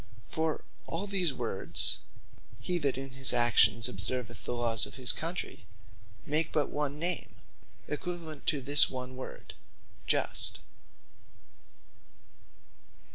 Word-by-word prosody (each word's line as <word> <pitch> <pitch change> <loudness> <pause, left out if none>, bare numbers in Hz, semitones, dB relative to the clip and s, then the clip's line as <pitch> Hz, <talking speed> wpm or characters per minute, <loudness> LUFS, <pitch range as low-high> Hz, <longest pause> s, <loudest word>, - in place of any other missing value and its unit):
For 160 -1 -2 0.2
all 165 +5 -3
these 190 -5 +1
words, 115 -7 +2 0.6
Hee 175 +10 -1
That 140 -4 -1
In 135 0 -6
His 135 -2 +3
Actions 120 -1 +5
Observeth 115 0 -4
The - - -3
Lawes 115 -2 +2
Of - - -11
His 130 -2 +2
Country, 165 - -4 0.6
make 155 +2 0
but 150 - 0
one 145 -1 -3
Name, 170 +1 -2 0.5
equivalent 160 -1 -5
to 145 - +1
this 145 +2 +6
one 130 0 -6
word, 130 - -9 0.5
Just. - - +1
135 Hz, 115 wpm, -30 LUFS, 120-160 Hz, 0.6 s, this